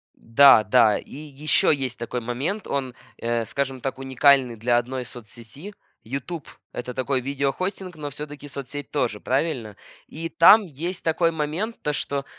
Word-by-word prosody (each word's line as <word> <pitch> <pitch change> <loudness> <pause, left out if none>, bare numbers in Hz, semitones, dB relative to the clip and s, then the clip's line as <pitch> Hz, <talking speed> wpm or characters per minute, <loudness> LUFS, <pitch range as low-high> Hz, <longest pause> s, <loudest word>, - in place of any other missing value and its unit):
Да 115 0 +6
да. 110 -1 +4
И - - -11
ещё 150 +1 +1
есть 135 -4 -1
такой 120 +1 -4
момент. 140 - -3
Он, 135 -3 -2 0.2
э, 115 -1 -1
скажем 135 +1 -3
так, 135 0 -3
уникальный 135 -2 +3
для 120 +2 +1
одной 125 +1 -3
соцсети. 120 - -9 0.3
"Ютуб"- 140 +6 -5 0.3
это 125 +1 -5
такой 130 +1 -1
видео 140 +1 -1
хостинг, 185 +1 -4
но 150 -2 -5
всё-таки 145 +1 -8
соцсеть 140 +1 -6
тоже, 120 -8 -1
правильно? 130 -6 -1 0.3
И 165 +2 -6
там 205 +7 +7
есть 170 +3 -5
такой 165 +1 +2
момент, 160 +9 -3
то 150 - -1
что 140 -1 -3
140 Hz, 155 wpm, -24 LUFS, 125-155 Hz, 0.3 s, там